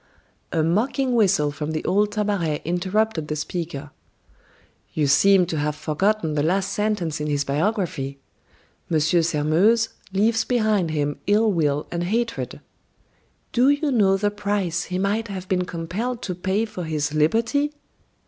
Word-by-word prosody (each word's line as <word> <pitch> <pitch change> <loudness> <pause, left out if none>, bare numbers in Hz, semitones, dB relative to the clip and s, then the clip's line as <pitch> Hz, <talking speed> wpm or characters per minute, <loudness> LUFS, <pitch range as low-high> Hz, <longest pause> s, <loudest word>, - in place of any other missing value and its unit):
A 160 - +1
mocking 245 - +1
whistle 185 -10 +3
from 150 +2 -4
the 155 - -3
old 205 +3 +2
Tabaret 200 -8 -1
interrupted 185 0 0
the 150 - -2
speaker. 150 -2 -5 1.0
"You 155 - +2
seem 185 +6 +5
to 165 -3 -3
have 150 0 -1
forgotten 160 +3 0
the 150 - +1
last 185 +5 0
sentence 195 -8 -1
in 150 - -2
his 145 -1 0
biography: 155 - -1 0.7
'M. 160 - +3
Sairmeuse 170 +7 +2 0.2
leaves 220 +4 +2
behind 215 -8 +1
him 145 -2 -1
ill 215 +2 +4
will 150 -4 0
and 175 0 -2
hatred.' 230 +4 -2 0.9
Do 250 +3 +4
you 285 +1 +1
know 200 -6 +3
the 205 +1 0
price 200 -4 -1
he 180 - -3
might 205 +4 0
have 190 -2 -6
been 180 -1 0
compelled 190 +9 -4
to 185 - -2
pay 190 +5 -1
for 185 -5 -6
his 150 -2 -2
liberty! 225 - +2
185 Hz, 150 wpm, -23 LUFS, 155-215 Hz, 1.0 s, seem